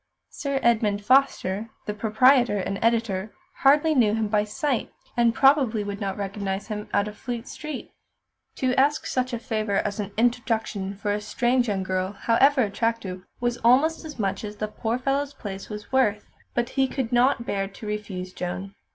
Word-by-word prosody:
Sir 280 -1 -2
Edmund 215 -3 +2
Foster, 230 -5 +2 0.2
the 210 - -2
proprietor 235 +2 +4
and 195 0 -2
editor, 225 -3 0 0.2
hardly 295 +3 +4
knew 225 -6 +3
him 220 -2 -1
by 210 0 +2
sight, 260 +4 -2 0.2
and 235 -1 +3
probably 270 -6 +4
would 200 0 -5
not 195 -1 -2
recognise 200 0 -3
him 210 -1 -5
out 205 - +2
of 210 - -7
Fleet 240 0 -5
Street. 305 -3 -7 0.6
To 255 -1 0
ask 290 +3 +3
such 255 0 -1
a 240 - -2
favour 215 -4 -2
as 200 +1 -1
an 205 -1 -3
introduction 220 -4 0
for 205 +1 -2
a 210 - -2
strange 240 +3 +1
young 195 -3 -1
girl, 185 +1 -2
however 260 +6 +3
attractive, 205 -3 -2 0.2
was 240 0 0
almost 275 +9 +3
as 305 -3 -8
much 195 -2 -1
as 210 0 -6
the 215 - -2
poor 225 +2 -2
fellow's 275 +2 -1
place 195 -2 -7
was 210 +2 -8
worth, 215 -6 +2 0.3
but 240 0 0
he 270 -1 +1
could 260 -3 -3
not 245 0 +3
bear 195 -3 -1
to 200 +2 -11
refuse 200 -3 -5
Joan. 185 +2 -5
220 Hz, 175 wpm, -25 LUFS, 205-255 Hz, 0.6 s, proprietor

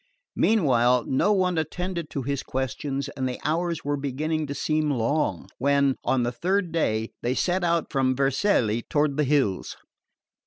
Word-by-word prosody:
Meanwhile 125 - +3
no 135 +10 +2
one 185 -4 +2
attended 175 0 -3
to 135 - -4
his 140 +1 -2
questions 135 +2 -3
and 130 -2 -3
the 125 - -5
hours 165 +1 -1
were 145 0 0
beginning 150 +3 -2
to 140 - -4
seem 155 0 0
long 120 - 0
when, 140 0 +3
on 130 -2 +1
the 120 - 0
third 180 +7 0
day, 110 -9 0
they 125 +2 0
set 180 +4 0
out 170 -2 0
from 130 -1 +1
Vercelli 135 - +1
toward 145 +2 0
the 150 - +2
hills. 135 -9 0
140 Hz, 160 wpm, -25 LUFS, 130-160 Hz, -, Meanwhile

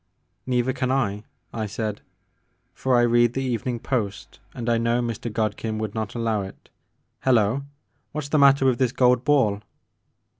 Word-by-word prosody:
* - - -47
" - - -49
"Neither 125 0 +1
can 130 0 -1
I," 105 -6 -1 0.3
I 110 -2 -3
said, 105 0 -4 0.7
"for 130 -2 +1
I 120 - +4
read 120 0 +3
the 135 - -2
Evening 125 -1 -2
Post, 110 -6 -3 0.2
and 120 -2 -5
I 115 -1 +2
know 115 +1 +1
Mr. 120 -1 -3
Godkin 110 0 -2
would 110 -1 -3
not 110 -1 -4
allow 115 -3 0
it. 95 0 -10 0.5
Hello 115 -2 +3
I - - -4 0.5
What 150 0 -4
's 140 - -8
the 155 - +2
matter 140 -1 +5
with 130 -3 +2
this 130 -3 +2
gold 125 -1 +3
ball?" 120 -8 +2
120 Hz, 185 wpm, -24 LUFS, 110-130 Hz, 0.7 s, matter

